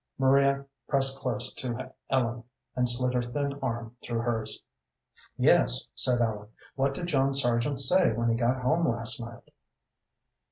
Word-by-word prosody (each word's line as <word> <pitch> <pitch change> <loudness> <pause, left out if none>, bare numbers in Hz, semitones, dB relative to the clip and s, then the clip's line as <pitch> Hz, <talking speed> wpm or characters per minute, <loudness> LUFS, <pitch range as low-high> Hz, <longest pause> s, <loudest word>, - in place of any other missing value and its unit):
Maria 140 +1 +3 0.2
pressed 135 -1 +1
close 120 -4 -1
to 120 -3 -5 0.2
Ellen, 120 -2 0 0.3
and 125 -1 +1
slid 125 +1 0
her 125 - +1
thin 140 +3 -3
arm 120 -2 -4
through 115 -1 -3
hers. 115 -2 -3 0.7
"Yes," - - +4
said 125 -1 +2
Ellen. 105 -2 -2 0.2
"What 135 0 0
did 175 - -4
John 135 -4 +1
Sargent 120 +1 +1
say 180 +5 +4
when 115 +1 0
he - - +3
got 125 +2 0
home 165 +6 +2
last 115 -1 -1
night?" 115 0 -10
125 Hz, 150 wpm, -28 LUFS, 115-135 Hz, 0.7 s, Yes